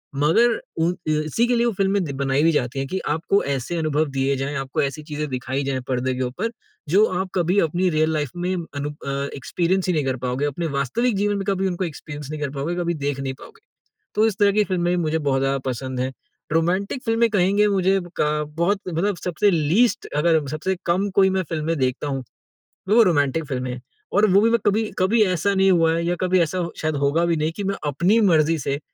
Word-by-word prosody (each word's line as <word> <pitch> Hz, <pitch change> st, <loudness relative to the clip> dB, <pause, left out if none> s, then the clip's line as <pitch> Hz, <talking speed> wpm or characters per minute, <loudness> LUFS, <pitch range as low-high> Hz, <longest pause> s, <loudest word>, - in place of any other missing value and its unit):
मगर, 195 Hz, +12 st, +3 dB, 0.2 s
उ 165 Hz, +1 st, +2 dB, 0.2 s
इ 155 Hz, 0 st, +2 dB
इसी 225 Hz, +10 st, +1 dB
के 245 Hz, -, +2 dB
लिए 235 Hz, 0 st, +2 dB
वो 235 Hz, -, +2 dB
फ़िल्में 195 Hz, 0 st, +1 dB
बनाई 140 Hz, +1 st, +1 dB
भी 165 Hz, -, +5 dB
जाती 130 Hz, -3 st, -1 dB
हैं 135 Hz, -, -2 dB
कि 190 Hz, +6 st, -3 dB
आपको 165 Hz, +6 st, +1 dB
ऐसे 140 Hz, +5 st, -2 dB
अनुभव 155 Hz, -1 st, +1 dB
दिए 135 Hz, +1 st, +1 dB
जाएँ, 135 Hz, +2 st, -3 dB
आपको 135 Hz, -2 st, -2 dB
ऐसी 140 Hz, +2 st, -3 dB
चीज़ें 150 Hz, 0 st, -4 dB
दिखाई 130 Hz, +1 st, -3 dB
जाएँ 135 Hz, -1 st, -2 dB
परदे 130 Hz, 0 st, -1 dB
के 130 Hz, -, -3 dB
ऊपर 155 Hz, -, -2 dB, 0.4 s
जो 200 Hz, +7 st, +5 dB
आप 190 Hz, 0 st, -2 dB
कभी 180 Hz, +2 st, +2 dB
अपनी 175 Hz, +2 st, +1 dB
रियल 155 Hz, -1 st, +1 dB
लाइफ 150 Hz, -3 st, -1 dB
में 175 Hz, +1 st, -2 dB
अनु 145 Hz, -4 st, -5 dB
अ, 140 Hz, -1 st, -4 dB
एक्सपीरियंस 175 Hz, +7 st, -1 dB
ही 180 Hz, -, +2 dB
नहीं 155 Hz, -3 st, +1 dB
कर 130 Hz, -1 st, 0 dB
पाओगे, 125 Hz, +3 st, -1 dB
अपने 155 Hz, +4 st, -2 dB
वास्तविक 170 Hz, -, 0 dB
जीवन 205 Hz, +1 st, +1 dB
में 195 Hz, -, -2 dB
कभी 195 Hz, -1 st, +1 dB
उनको 185 Hz, 0 st, -2 dB
एक्सपीरियंस 150 Hz, -3 st, -8 dB
नहीं 155 Hz, -, -5 dB
कर 145 Hz, -, -1 dB
पाओगे, 145 Hz, +5 st, -2 dB
कभी 170 Hz, -1 st, -1 dB
देख 145 Hz, -3 st, -3 dB
नहीं 135 Hz, -1 st, -3 dB
पाओगे। 455 Hz, 0 st, -14 dB, 0.5 s
तो 215 Hz, +1 st, +4 dB
इस 210 Hz, -4 st, -2 dB
तरह 205 Hz, -1 st, +5 dB
की 210 Hz, +1 st, +3 dB
फ़िल्में 175 Hz, -3 st, 0 dB
भी -, -, +1 dB
मुझे 160 Hz, 0 st, 0 dB
बहुत 140 Hz, -3 st, 0 dB
ज़्यादा 135 Hz, 0 st, +1 dB
पसंद 130 Hz, +1 st, -4 dB
हैं। 130 Hz, +1 st, -1 dB, 0.4 s
रोमांटिक 185 Hz, -, 0 dB
फ़िल्में 230 Hz, 0 st, +2 dB
कहेंगे 200 Hz, +1 st, +3 dB
मुझे 195 Hz, -1 st, +2 dB, 0.2 s
क 150 Hz, 0 st, +1 dB
बहुत 195 Hz, +4 st, +1 dB
मतलब 180 Hz, +3 st, -1 dB
सबसे 180 Hz, +4 st, +1 dB
लीस्ट 175 Hz, +9 st, +2 dB
अगर 160 Hz, +2 st, +3 dB
हम 150 Hz, -2 st, -3 dB
सबसे 155 Hz, +7 st, -2 dB
कम 185 Hz, +4 st, +1 dB
कोई 190 Hz, -1 st, +5 dB
मैं 190 Hz, 0 st, 0 dB
फ़िल्में 165 Hz, 0 st, -1 dB
देखता 130 Hz, +2 st, -1 dB
हूँ, 135 Hz, -2 st, -3 dB, 0.7 s
वो 230 Hz, +3 st, +6 dB
रोमांटिक 155 Hz, -4 st, +1 dB
फ़िल्में। 125 Hz, -2 st, -4 dB, 0.3 s
और 205 Hz, -, +5 dB
वो 195 Hz, +2 st, +6 dB
भी 225 Hz, -, +4 dB
मैं 235 Hz, 0 st, +3 dB
कभी 210 Hz, +2 st, +3 dB, 0.2 s
कभी 205 Hz, +5 st, +3 dB
ऐसा 185 Hz, +1 st, +1 dB
नहीं 190 Hz, 0 st, +4 dB
हुआ 165 Hz, -2 st, +4 dB
है 170 Hz, +1 st, -1 dB
या 175 Hz, +1 st, 0 dB
कभी 185 Hz, 0 st, +3 dB
ऐसा 170 Hz, +1 st, -1 dB
शायद 155 Hz, -1 st, -1 dB
होगा 145 Hz, +4 st, +2 dB
भी 170 Hz, -1 st, +1 dB
नहीं 155 Hz, +1 st, 0 dB
कि 205 Hz, -, -3 dB
मैं 195 Hz, 0 st, -1 dB
अपनी 175 Hz, +10 st, +2 dB
मर्ज़ी 165 Hz, -5 st, +3 dB
से, 140 Hz, +1 st, -2 dB
165 Hz, 225 wpm, -22 LUFS, 140-190 Hz, 0.7 s, वो